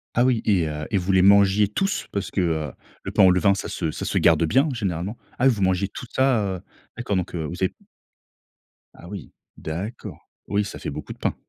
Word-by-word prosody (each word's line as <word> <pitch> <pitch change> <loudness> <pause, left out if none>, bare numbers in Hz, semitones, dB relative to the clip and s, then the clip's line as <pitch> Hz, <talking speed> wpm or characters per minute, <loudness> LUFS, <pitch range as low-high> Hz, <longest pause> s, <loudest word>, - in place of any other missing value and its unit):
Ah 120 - +4
oui, 125 -4 +2
et 95 -6 +3
heu, 75 0 -5
vous 95 -1 +1
les 95 -1 +5
mangiez 100 +1 +5
tous? 195 - -2
Parce 100 - -3
que, 95 - 0
heu, 80 -4 -1 0.3
le - - -5
pain - - +4
au 95 - +8
levain, 90 +2 +4
ça 100 - -4
se 80 -3 -2
ça - - -5
se - - -1
garde 80 0 +4
bien 135 - +3
généralement. 100 -1 -3 0.2
Ah, 130 - +4
vous 115 -6 +2
mangez 95 0 +2
tout 125 - -9
ça, 130 -5 +2
heu? - - -13 0.4
D'accord 120 -4 -2
donc, 90 -1 -2
heu, 80 - -2
vous 80 +2 -5
avez 95 - +3 1.2
Ah 85 - -13
oui! 100 +2 -8 0.3
D'accord. 90 +9 -7 0.2
Oui, 100 +1 +1
ça 100 - -7
fait - - -4
beaucoup - - -6
de - - -22
pain. - - -1
95 Hz, 220 wpm, -23 LUFS, 85-105 Hz, 1.2 s, au